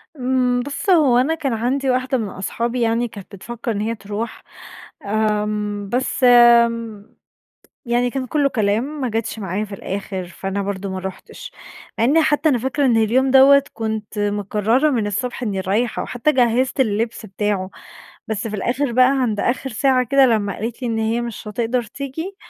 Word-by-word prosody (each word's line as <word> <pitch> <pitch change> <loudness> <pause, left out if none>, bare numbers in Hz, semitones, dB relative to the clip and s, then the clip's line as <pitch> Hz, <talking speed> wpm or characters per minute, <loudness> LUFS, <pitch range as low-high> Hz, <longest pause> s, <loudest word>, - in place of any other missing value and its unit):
إمم، 250 -1 +1
بُص 290 +8 -4
هو 295 -9 +5
أنا 285 +6 +2
كان 275 -6 -2
عندي 260 +4 -1
واحدة 255 +1 +1
من 215 -4 -3
أصحابي 235 +6 -3
يعني 230 +1 +1
كانت 200 -2 -11
بتفكر 235 +4 -5
إن 205 -1 -2
هي 225 +2 -2
تروح، 215 +2 -6 0.8
امم، 210 -1 -2
بس 260 +1 -1
امم، 235 -3 +4 0.7
يعني 245 +1 +1
كان 265 0 -3
كله 285 +2 +1
كلام 235 +6 -1
ما 255 - -1
جاتش 225 0 -3
معايا 200 +1 -3
في 200 -1 -8
الآخر، 195 -1 -5
فأنا 195 +2 -4
برضو 195 0 -4
ما 190 - -4
رحتش. 190 - -8 0.5
مع 225 - +2
أني 300 +7 +4
حتى 305 0 +2
أنا 255 -5 +2
فاكرة 265 +3 0
إن 235 -3 +3
اليوم 250 +5 +2
دوّة 275 +1 +7
كنت 220 -1 -4
مقررة 210 +7 +1
من 225 -6 0
الصبح 250 +5 -3
إني 200 -4 -2
رايحة، 210 +5 -1
حتى 250 +5 0
جهزت 255 +1 +1
اللبس 225 -1 -1
بتاعه، 200 -1 -2 0.6
بس 220 +1 -3
في 215 - -4
الآخر 250 +6 -1
بقى 255 +2 +5
عند 215 -4 -1
آخر 260 +4 -1
ساعة 255 +1 +2
كده 275 +3 +4
لما 215 -5 +1
قالت 230 +4 -5
لي 245 - -2
إن 225 - -1
هي 225 +2 0
مش 235 -2 -6
هتقدر 235 +3 -1
تيجي، 280 - -6
235 Hz, 175 wpm, -20 LUFS, 210-260 Hz, 0.8 s, دوّة